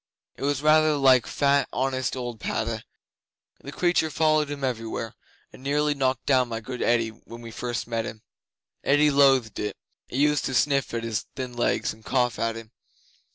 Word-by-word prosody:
It - - -15
was 140 0 0
rather 155 0 +5
like 130 -3 +5
fat, 140 -2 +2
honest 130 -1 -1
old 120 -3 -5
Padda. 110 +1 -2 0.8
The 140 - -8
creature 170 0 +1
followed 155 -1 +2
him 145 -1 -6
everywhere, 115 -3 -3 0.4
and - - -13
nearly 145 +2 +1
knocked 130 -2 -1
down 130 -3 +3
my 115 -1 -3
good 125 +3 -7
Eddi 115 -1 +2
when 115 +1 -13
we 115 -1 -9
first 120 +1 -4
met 115 -1 -2
him. 110 -1 -9 0.6
Eddi 145 +1 +4
loathed 135 -5 +3
it. 105 - -3 0.3
It - - -4
used 150 0 +2
to 130 - -2
sniff 140 0 +2
at 115 - -2
his 115 -2 -3
thin 130 -2 -5
legs 120 - 0
and 110 0 -18
cough 125 -1 0
at 115 0 0
him. 115 -1 -10
130 Hz, 180 wpm, -25 LUFS, 115-145 Hz, 0.8 s, rather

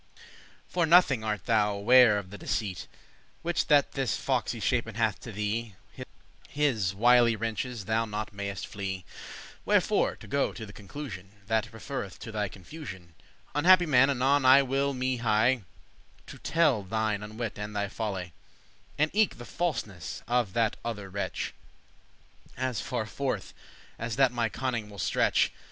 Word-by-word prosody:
For 175 -2 0
nothing 155 -9 +5
art 105 -2 -2
thou 105 -3 +2
ware 120 +1 +6
of 95 -2 -6
the 105 - -8
deceit 100 -5 -3 0.6
Which 175 0 0
that 145 -2 +4
this 135 -3 -1
fox 130 -3 0
y 115 - -6
shapen* 115 -1 0
hath 110 -3 +1
to 120 - -8
thee; 105 +1 -3 0.2
*contrived - - -8 0.4
His 115 -10 0
wily 120 +1 +5
wrenches* 115 0 -3
thou 110 +2 +1
not 105 -1 -5
mayest 100 0 -4
flee. 95 -2 -5
*snares - - -13
Wherefore, - - +2
to - - -13
go 140 0 0
to 110 - -7
the 105 - -12
conclusioun 100 -3 -8 0.2
That 110 +1 0
referreth 115 -4 -6
to 115 - -7
thy 105 -1 -1
confusion, 95 - -10 0.4
Unhappy 175 +4 +6
man, 135 -3 +5
anon 135 +1 +2
I 130 +2 +7
will 135 +1 0
me 130 0 -1
hie* 115 +1 +3
*hasten 105 - -19 0.6
To - - -11
telle 155 -9 +2
thine 110 +1 -1
unwit* 110 +1 -5
and 105 0 -5
thy 100 0 0
folly, 95 -5 -4
*stupidity - - -32
And 155 - +1
eke 215 +1 +2
the 120 - -9
falseness 110 - -3
of 120 -5 +1
that 115 -2 +1
other 105 -5 -5
wretch, 95 -2 -3 1.0
As 130 -3 -1
farforth 120 -1 -3 0.5
as 115 -1 -3
that 135 -2 +4
my 120 -2 0
conning* 120 -3 -3
will 100 - -12
stretch. 85 - +2
115 Hz, 160 wpm, -28 LUFS, 105-130 Hz, 1.0 s, I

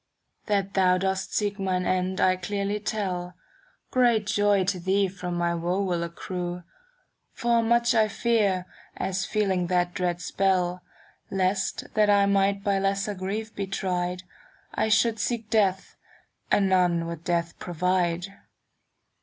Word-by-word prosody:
•* - - -40
That 200 -2 0
thou 185 -1 +4
dost 190 0 -2
seek 205 -1 -1
mine 185 -2 0
end 185 0 0
I 185 0 +4
clearly 200 +2 -2
tell, 185 -4 -3 0.6
Great 240 -4 +3
joy 205 -1 +2
to 185 0 -1
thee 190 +3 +2
from 180 -1 -5
my 170 0 0
woe 175 +3 -1
will 180 -3 -1
accrue: 175 +1 -5 0.7
For 235 -1 +2
much 235 +1 +3
I 220 -2 +4
fear, 210 -4 +1 0.3
as 190 0 -2
feeling 190 -4 0
that 175 0 +1
dread 175 -1 -1
spell. 180 -1 0 0.5
Lest, 190 0 0
that 210 -1 +3
I 200 -1 +5
might 200 0 +2
by 200 -2 +1
lesser 195 +1 0
grief 205 +4 -4
be 200 -1 -3
tried, 180 -1 -2 0.5
I 220 - 0
should 220 +1 +3
seek 230 -2 -2
death, 195 -4 +1 0.6
and 195 - +4
none 180 -3 +2
would 165 -1 -6
death 170 -1 -1
provide. 175 0 0
190 Hz, 145 wpm, -26 LUFS, 180-205 Hz, 0.7 s, I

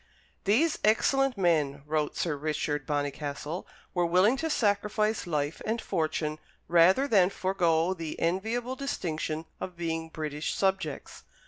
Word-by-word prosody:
"These 280 +11 +3
excellent 265 +4 +3
men," 150 -6 +1
wrote 150 0 -1
Sir 165 -4 0
Richard 150 -1 -2
Bonnycastle, 145 +3 -3 0.3
"were 175 - +1
willing 185 +8 +4
to 320 +3 -2
sacrifice 210 - +1
life 150 -2 -1
and 225 +2 -1
fortune 155 -5 -1 0.3
rather 180 +11 +5
than 195 -8 +5
forego 180 -3 +1
the 165 -4 -6
enviable 225 +9 -1
distinction 160 - -3
of 180 -2 -6
being 165 -1 -3
British 150 -1 -3
subjects." 190 -7 -1
170 Hz, 125 wpm, -29 LUFS, 155-210 Hz, 0.3 s, rather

